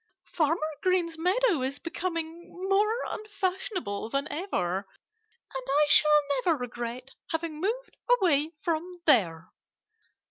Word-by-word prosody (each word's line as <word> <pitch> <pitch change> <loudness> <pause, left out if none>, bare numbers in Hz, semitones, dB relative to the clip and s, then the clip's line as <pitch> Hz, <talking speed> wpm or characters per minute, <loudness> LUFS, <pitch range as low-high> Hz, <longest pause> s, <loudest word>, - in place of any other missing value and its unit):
"Farmer 315 0 0
Green's 360 -3 +1
meadow 365 - +2
is 265 +2 -2
becoming 335 0 -4 0.2
more 425 +5 +2
unfashionable 380 - -3
than 275 +3 -1
ever. 195 - -2 0.7
And 265 -1 -4
I 290 +2 +4
shall 300 0 +6 0.2
never 330 -3 +3
regret 245 +1 -5 0.2
having 325 -1 -3
moved 475 +6 -2
away 335 - +3
from 340 +1 -1
there." 170 - +3
325 Hz, 110 wpm, -28 LUFS, 275-370 Hz, 0.7 s, shall